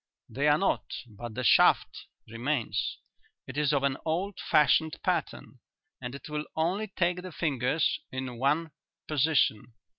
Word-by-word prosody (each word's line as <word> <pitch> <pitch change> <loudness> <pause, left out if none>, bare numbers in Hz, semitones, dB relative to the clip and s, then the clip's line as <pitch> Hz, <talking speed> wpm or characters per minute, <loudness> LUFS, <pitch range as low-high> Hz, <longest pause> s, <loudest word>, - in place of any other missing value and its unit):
"They 140 +3 -1
are 150 0 +5
not, 195 - 0
but 115 0 -9
the 130 - -3
shaft 115 - +4 0.2
remains. 115 - -2 0.5
It 130 - -9
is 150 -1 +2
of 140 -2 +1
an 140 -1 +1
old 180 +5 -2
fashioned 150 +2 +3
pattern - - -2 0.4
and 125 +1 -5
it 140 - -9
will 150 0 -3
only 180 +7 0
take 180 -2 0
the 185 0 -8
fingers 150 0 0
in 130 -2 -5
one 150 +5 +1 0.4
position. 140 -7 +1
150 Hz, 145 wpm, -29 LUFS, 125-160 Hz, 0.5 s, are